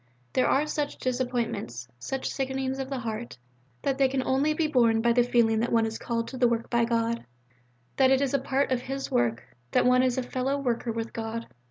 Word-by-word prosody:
There 255 - +3
are 280 +3 +3
such 295 -1 -2
disappointments, 245 - -2
such 265 - -3
sickenings 265 0 -2
of 265 0 -4
the 275 - -2
heart, 225 - -5 0.5
that 275 0 0
they 270 - +5
can 260 0 -1
only 270 +4 +2
be 320 - +1
borne 235 -7 +3
by 235 +1 +3
the 245 - +4
feeling 235 -2 +3
that 235 +1 0
one 230 -1 +3
is 225 0 -4
called 230 -1 -2
to 260 - -7
the 245 - +5
work 235 -1 -1
by 235 -1 +3
God, 230 0 0 0.7
that 265 -1 +5
it 265 0 +4
is 275 -1 0
a 280 - +3
part 270 +1 0
of 250 -1 +1
His 270 +1 -5
work, 115 -1 +1 0.3
that - - +4
one 250 0 +5
is 255 0 +1
a 260 - 0
fellow 260 +3 -1
worker 245 -3 -1
with 225 0 -4
God. 230 0 -4
250 Hz, 220 wpm, -27 LUFS, 230-265 Hz, 0.7 s, they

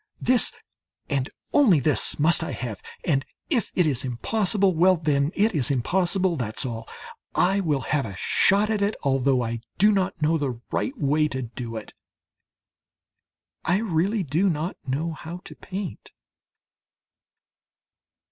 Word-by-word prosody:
this 250 -2 +3 0.6
and 135 -2 0 0.2
only 225 - +5
this 145 +3 +1
must 165 +3 +3
I - - -4
have, 115 -6 -5 0.2
and 135 -5 +2 0.3
if 240 - +1
it 180 - +3
is 135 -5 +1
impossible, 195 - +1
well 180 +3 +4
then, 145 -2 +1
it 210 +2 +2
is 140 -7 +1
impossible, 175 - +1
that's 120 -3 -2
all. 115 -3 -5 0.5
I 195 +2 +3
will 150 -8 0
have 140 -4 -1
a 100 - -8
shot 205 - +3
at 210 -2 0
it 200 +1 +1
although 135 -2 +2
I 115 0 -3 0.2
do 210 +3 +5
not 195 -2 0
know 160 +1 +2
the 130 -5 -3
right 270 +1 -2
way 150 -2 +2
to 130 -3 -4
do 120 0 -7
it." 110 - -7 1.7
I 175 +3 +2
really 195 0 0
do 170 +6 +1
not 165 +2 -2
know 150 +6 -1
how 160 +1 -7
I - - -9
paint. 195 -1 -6
160 Hz, 145 wpm, -25 LUFS, 135-190 Hz, 1.7 s, only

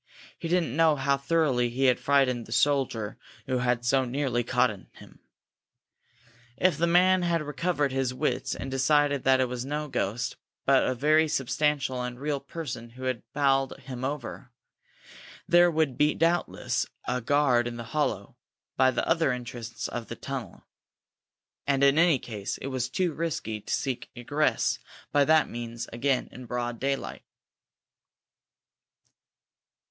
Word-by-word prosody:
He 165 - -4
didn't 165 -7 0
know 160 -1 +4
how 140 0 +1
thoroughly 140 -4 +1
he 125 +3 -2
had 125 -1 +4
frightened 130 -4 +2
the - - -12
soldier 125 -6 +1 0.3
who 130 - 0
had 125 -1 0
so 130 +2 +3
nearly 125 -1 -1
caught - - +2
him. - - -12 1.7
If 185 0 +3
the 170 - +3
man 180 +2 +4
had 170 -2 +1
recovered 150 -1 -1
his 135 -1 0
wits 125 - -1
and 135 - -6
decided 145 +1 +2
that 130 0 +5
it 130 - +3
was 125 0 -4
no 150 +3 -3
ghost, 120 -3 -2 0.3
but 135 -1 +5
a 130 - 0
very 155 +5 +3
substantial 135 -2 0
and 125 0 -5
real 145 0 -1
person 135 -5 -6
who 125 +3 -12
had 130 -3 -1
bowled 135 -2 +2
him 130 -2 -8
over, 130 -2 -5 1.0
there 175 0 +6
would 155 -6 0 0.2
doubtless 170 +2 0
be - - -25 0.2
a 125 +1 -1
guard 125 -2 +3
in 120 0 -5
the 115 - -5
hollow, 125 -10 -1 0.4
by 130 0 +4
the 130 - -1
outer 165 -4 +2
entrance 120 -1 -5
of 120 -2 -5
the - - -6
tunnel. - - -7 1.0
And, 140 -1 +2
in 140 +2 +5
any 170 -4 +5
case, 105 -5 -5
it 135 - -5
was 125 -1 -1
too 175 +3 0
risky 140 -10 -3
to - - -8
seek 130 -3 -2
egress 145 +5 0 0.3
by 145 -1 +4
that 155 +1 +4
means 115 0 -6
again 130 +2 0
in 125 -1 -10
broad 120 -1 -3
daylight. 135 0 -2
135 Hz, 155 wpm, -27 LUFS, 125-150 Hz, 1.7 s, there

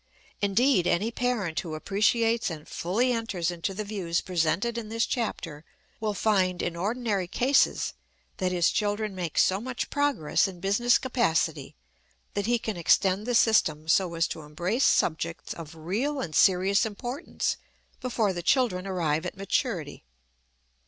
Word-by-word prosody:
Indeed, 200 -1 +3
any 205 +6 +1
parent 230 -9 -1
who 160 -3 -5
appreciates 225 +6 +1
and 155 -3 -8
fully 235 +9 0
enters 200 -7 -1
into 175 +3 -3
the 205 +3 -4
views 190 -5 -2
presented 185 +6 0
in 230 -2 -5
this 230 +1 0
chapter 170 - -3 0.4
will 215 -2 -2
find, 185 -3 +1
in 175 - -2
ordinary 205 0 -1
cases, 255 +9 +2 0.4
that 185 -4 0
his 175 -2 +2
children 210 0 -1
make 175 -4 -5
so 190 +2 +3
much 250 0 -4
progress 280 - +1
in 185 -2 -9
business 205 +6 +3
capacity 165 - 0 0.6
that 205 +1 -2
he 240 0 +3
can 220 -4 -4
extend 190 +5 +2
the 245 - +1
system 165 -10 +3
so 170 +1 +2
as 165 0 +2
to 160 - -5
embrace 175 - -1
subjects 165 +1 0
of 165 -1 -10
real 215 - -2
and 165 -12 -4
serious 190 +2 +4
importance 240 +5 -3 0.4
before 225 -5 0
the 175 - -4
children 195 -3 +1
arrive 165 -5 0
at 180 - -5
maturity. 195 - -2
195 Hz, 150 wpm, -27 LUFS, 170-230 Hz, 0.6 s, serious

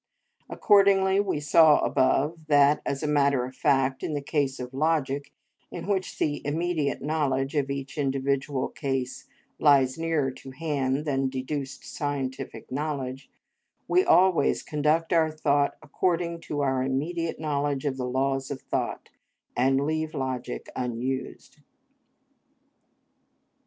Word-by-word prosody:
Accordingly 195 -1 +4
we 195 -7 0
saw 150 +1 +6
above 150 +5 +1
that, 145 0 +4
as 140 +1 -2
a - - 0
matter 140 -3 +2
of 130 +1 -9
fact, 135 -2 +1
in 155 - -3
the 145 - -2
case 140 -2 -1
of 125 0 -6
logic, 145 -1 0 0.4
in - - -7
which 190 -2 -2
the 145 -1 -1
immediate 155 -2 -1
knowledge 140 -2 0
in 140 -2 0
each 140 +1 -5
individual 135 0 0
case 135 -3 -3 0.3
lies 135 -2 +4
nearer 160 -5 0
to 135 - -12
hand 140 -1 -2
than 135 -2 0
deduced 135 +1 -5
scientific 135 -4 -4
knowledge, 135 -2 -4 0.6
we 365 +1 +4
always 185 - +3
conduct 155 +3 0
our 160 -2 +4
thought 145 -2 +1
according 170 -2 -1
to 150 -3 -4
our 135 -2 +1
immediate 155 +6 -2
knowledge 145 -2 -1
of 135 -2 -1
the 125 -1 -3
laws 135 +1 -1
of 140 - -4
thought, - - -3 0.5
and 135 +2 +2
leave 155 0 -2
logic 130 - -4
unused. 125 +2 -4
140 Hz, 130 wpm, -26 LUFS, 135-155 Hz, 0.6 s, saw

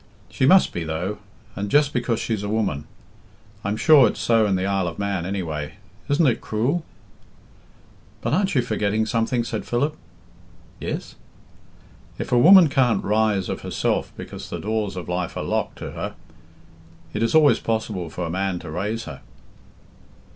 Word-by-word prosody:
She 130 - +1
must 190 +5 +5
be, 85 - -3
though, 85 +6 -3 0.4
and 100 +1 -3
just 145 +4 +3
because 120 -2 0
she's 110 -3 -2
a 100 - -4
woman. 100 -10 -1 0.8
I'm 100 +2 -1
sure 145 -4 +7
it's - - -4
so 115 -2 +3
in 100 - +1
the 95 0 -1
Isle 95 -2 0
of 85 - -5
Man, 100 -3 -2
anyway. 80 -6 -4 0.3
Isn't 145 +3 +3
it 120 -4 +2
cruel?" 130 +11 -1 1.4
"But - - -1
aren't 195 -4 +1
you 125 - +3
forgetting 110 -1 0
something?" 115 +2 0
said 110 -2 -4
Philip. 145 +6 -1 0.8
"Yes?" - - -5 1.0
"If - - -5
a 125 - +4
woman 180 +4 +8
can't 130 -5 +2
rise 105 -2 +1
of - - -4
herself - - -1
because - - -8
the - - -4
doors 110 -2 -2
of 90 - -6
life 90 0 -3
are - - -2
locked - - -2
to - - -6
her, - - -5 1.0
it 105 - -2
is 115 +6 +1
always 145 -6 +6
possible 110 -6 -2
for 85 +2 -4
a - - -4
man 95 0 -1
to 80 - -8
raise 105 +7 -3
her." 70 -3 -9
110 Hz, 170 wpm, -23 LUFS, 95-120 Hz, 1.4 s, woman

